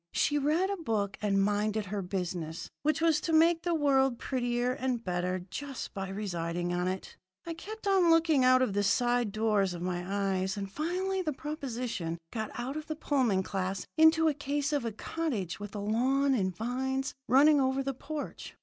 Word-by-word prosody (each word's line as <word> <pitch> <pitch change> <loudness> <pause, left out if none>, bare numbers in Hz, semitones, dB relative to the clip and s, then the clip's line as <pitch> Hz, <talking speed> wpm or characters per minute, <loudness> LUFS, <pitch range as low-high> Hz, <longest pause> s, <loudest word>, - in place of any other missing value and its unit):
She 295 0 +2
read 320 +7 +1
a 400 - -2
book 215 - -1
and 195 -2 +2
minded 210 +1 0
her 200 +1 -3
business, 180 -3 -4
which 305 +2 +1
was 325 -2 +3
to 330 - -2
make 330 +1 +5
the 345 -1 0
world 270 -4 +3
prettier 245 -1 -1
and 255 -2 -2
better 180 -1 -2
just 275 +4 -6
by 195 -1 -4
residing 175 -3 -2
on 180 +1 0
it. 185 0 -4 0.3
I 335 - -4
kept 430 +7 -9
on 380 -3 +4
looking 325 -4 +4
out 255 0 +6
of 210 - 0
the 205 - +1
side 240 +2 +2
doors 210 -3 +1
of 175 - -6
my 180 -1 -2
eyes, 190 0 -1
and 195 -1 -4
finally 370 - -1
the 310 -4 -2
proposition 250 - -4
got 220 +1 -3
out 255 +4 -3
of 310 0 -5
the 310 - -3
Pullman 255 -11 +1
class 190 0 -3
into 320 0 +6
a 310 - +3
case 285 +1 -2
of 285 -5 0
a 230 - -1
cottage 220 - -3
with 205 0 -7
a - - -3
lawn 260 +7 +2
and 185 -7 0
vines 265 +4 -2
running 285 +4 +6
over 265 +1 +1
the 275 0 -2
porch. 290 +3 -6
245 Hz, 190 wpm, -30 LUFS, 195-295 Hz, 0.3 s, out